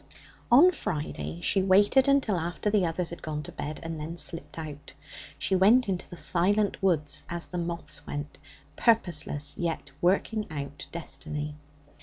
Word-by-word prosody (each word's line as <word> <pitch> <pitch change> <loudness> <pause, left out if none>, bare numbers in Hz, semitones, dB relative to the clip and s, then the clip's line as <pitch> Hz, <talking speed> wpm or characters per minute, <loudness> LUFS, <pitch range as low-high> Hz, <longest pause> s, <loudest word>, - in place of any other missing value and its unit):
On 310 +10 +8
Friday 85 - -4
she 195 - +2
waited 205 +8 +5
until 275 -8 +3
after 175 +5 -2
the 205 -3 +3
others 165 +1 -2
had 170 - -8
gone 150 -1 -4
to - - -7
bed, 150 +1 -5
and 165 -2 -5
then 165 +3 -5
slipped 155 -3 -3
out. 150 -3 -8 0.4
She 190 - 0
went 215 +7 +5
into 185 -2 -2
the 175 - -9
silent 200 +5 +1
woods 155 -6 +1
as 170 0 -3
the 180 - -5
moths 170 0 -4
went, 145 +1 -5 0.4
purposeless, 155 -10 +1
yet 170 -2 -2
working 205 +4 +1
out 145 -1 -6
destiny. 150 -2 -4
170 Hz, 155 wpm, -28 LUFS, 150-195 Hz, 0.4 s, On